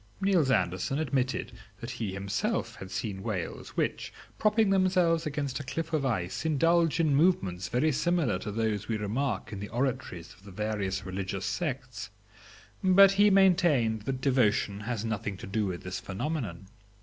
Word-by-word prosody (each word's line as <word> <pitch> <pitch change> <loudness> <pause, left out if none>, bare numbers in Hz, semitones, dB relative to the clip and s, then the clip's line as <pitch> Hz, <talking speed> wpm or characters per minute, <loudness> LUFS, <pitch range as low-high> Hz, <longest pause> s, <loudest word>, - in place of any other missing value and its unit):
Niels 190 -8 +2
Andersen 95 +3 +1
admitted 135 -4 -1 0.3
that 120 +1 -6
he 120 -3 -4
had 95 - -4
himself 100 0 -2
seen 95 0 -4
whales 95 -5 -5
which, - - -1 0.3
propping 215 -1 +3
themselves 180 -4 +3
against 140 -3 -3
a - - -5
cliff 165 +4 -4
of 145 -4 +1
ice, 90 -7 -2
indulged 165 +2 +2
in 155 -4 +3
movements 100 - +2
very 145 +6 +2
similar 150 - +1
to 105 - -5
those 110 -1 -1
we 110 - -1
remark 110 +2 -2
in 100 - -5
the 105 +1 -6
oratories 120 -9 -3
of 95 - -22
the 100 - -12
various 100 -1 -2
religious 95 0 -4
sects, 125 - -3 0.7
but 190 +1 +7
he 205 +1 +5
maintained 175 - +4
that 130 +4 -3
devotion 110 -7 +2
has 110 0 -3
nothing 105 -3 -3
to - - -8
do 100 +1 -1
with 90 -2 -5
this 90 0 -5
phænomenon. 100 - -4
120 Hz, 160 wpm, -29 LUFS, 100-160 Hz, 0.7 s, but